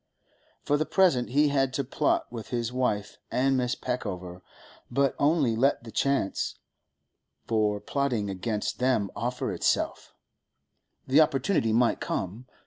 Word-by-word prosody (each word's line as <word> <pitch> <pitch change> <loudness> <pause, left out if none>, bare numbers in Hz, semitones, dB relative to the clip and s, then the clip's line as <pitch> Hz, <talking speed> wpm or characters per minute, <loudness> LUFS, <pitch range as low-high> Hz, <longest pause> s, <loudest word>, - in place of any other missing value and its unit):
For 145 - +2
the 155 - 0
present 170 -11 +3
he 145 +3 +3
had 135 -2 +1
to 140 - 0
plot 140 +3 0
with 115 -4 -7
his 120 -1 -2
wife 110 -5 -1
and 135 +2 +2
Mrs. 125 0 -1
Peckover, 95 -8 -4 0.5
but 135 +2 +2
only 145 -6 +3
let 135 +2 +2
the 115 - -9
chance 140 -7 0 0.9
for 105 -2 +1
plotting 125 -5 -1
against 105 +3 -3
them 125 -6 +1
offer 120 +4 -2
itself! - - -1 0.9
The 140 +4 +5
opportunity 150 - +2
might 120 +1 +2
come. 105 +7 -4
125 Hz, 135 wpm, -27 LUFS, 110-140 Hz, 0.9 s, The